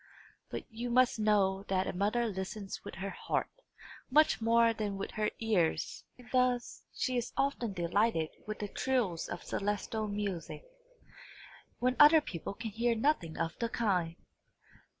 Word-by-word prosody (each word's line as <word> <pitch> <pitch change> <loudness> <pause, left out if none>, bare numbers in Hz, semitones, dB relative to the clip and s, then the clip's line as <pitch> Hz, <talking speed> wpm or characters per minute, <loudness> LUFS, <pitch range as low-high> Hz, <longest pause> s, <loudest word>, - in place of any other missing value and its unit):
But - - -5
you 235 +2 -4
must 245 -1 +3
know 200 -2 +2
a 190 -1 0
mother 210 +6 +1
listens 195 -1 -5
with - - -8
her 195 +2 -4
heart, - - -2 0.6
much 300 -2 +4
more 230 0 +4
than 210 -3 -3
with 195 - -4
her 215 0 0
ears; 205 -8 0
and 250 -1 -15
thus 250 -1 +1
she 255 -2 -1
is 240 0 -3
often 260 -6 0
delighted 175 -1 +1 0.2
with 215 - -4
the 210 - -4
trills 225 -8 -1
of 175 - -5
celestial 210 +2 -2
music, 205 - -4 1.1
when 255 +1 +1
other 300 +2 +9
people 195 - -6
can 225 0 -5
hear 230 +2 +1
nothing 220 - 0
of 165 - -2
the 230 -1 0
kind. 180 -8 0
215 Hz, 150 wpm, -32 LUFS, 195-240 Hz, 1.1 s, other